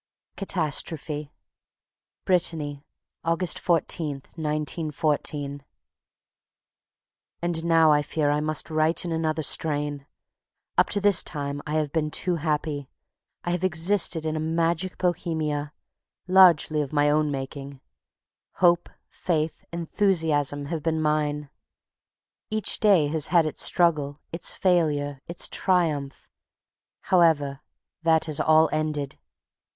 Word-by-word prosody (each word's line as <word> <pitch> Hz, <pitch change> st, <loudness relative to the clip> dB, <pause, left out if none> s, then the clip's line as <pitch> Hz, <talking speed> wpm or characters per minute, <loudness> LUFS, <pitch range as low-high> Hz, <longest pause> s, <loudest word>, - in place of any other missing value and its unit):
Catastrophe 155 Hz, -5 st, -2 dB, 0.9 s
Brittany, 155 Hz, -6 st, 0 dB, 0.4 s
August 165 Hz, +1 st, +1 dB
14, 155 Hz, -4 st, 0 dB
1914. 150 Hz, -2 st, -2 dB, 1.8 s
And 170 Hz, -1 st, -1 dB
now 165 Hz, -2 st, +5 dB
I 150 Hz, 0 st, +4 dB
fear 145 Hz, 0 st, 0 dB
I 145 Hz, -, +1 dB
must 155 Hz, +1 st, -2 dB
write 155 Hz, +2 st, +1 dB
in 170 Hz, -, -3 dB
another 160 Hz, -1 st, -1 dB
strain. 145 Hz, -2 st, -1 dB, 0.7 s
Up -, -, +3 dB
to 205 Hz, -, +1 dB
this 200 Hz, -2 st, +4 dB
time 145 Hz, -1 st, -5 dB
I 150 Hz, -, -3 dB
have 155 Hz, -2 st, 0 dB
been 155 Hz, -1 st, 0 dB
too 175 Hz, +3 st, 0 dB
happy. 150 Hz, -3 st, -2 dB, 0.5 s
I 175 Hz, -, -2 dB
have 175 Hz, +1 st, -2 dB
existed 170 Hz, -1 st, +1 dB
in 155 Hz, 0 st, -1 dB
a -, -, -2 dB
magic 165 Hz, +3 st, -1 dB
Bohemia, 155 Hz, -4 st, -2 dB, 0.6 s
largely 175 Hz, -5 st, +5 dB
of 140 Hz, -, -4 dB
my 145 Hz, -1 st, +2 dB
own 150 Hz, 0 st, +2 dB
making. 135 Hz, 0 st, -6 dB, 0.7 s
Hope, 175 Hz, -1 st, +3 dB, 0.2 s
faith, 160 Hz, -3 st, -2 dB
enthusiasm 160 Hz, -5 st, 0 dB
have 160 Hz, +1 st, -4 dB
been 160 Hz, +1 st, -1 dB
mine. 150 Hz, -1 st, -1 dB, 1.0 s
Each 215 Hz, -2 st, 0 dB
day 195 Hz, -8 st, +4 dB
has 155 Hz, -1 st, -1 dB
had 170 Hz, -1 st, +4 dB
its 155 Hz, -, -3 dB
struggle, 150 Hz, -5 st, +2 dB
its 165 Hz, -, -5 dB
failure, 145 Hz, -6 st, 0 dB
its 170 Hz, 0 st, -1 dB
triumph. 155 Hz, -7 st, 0 dB, 0.7 s
However, 155 Hz, -6 st, +2 dB, 0.4 s
that 165 Hz, -1 st, +2 dB
is 155 Hz, -2 st, -1 dB
all 160 Hz, 0 st, +5 dB
ended. 150 Hz, -3 st, -2 dB
155 Hz, 115 wpm, -25 LUFS, 145-170 Hz, 1.8 s, now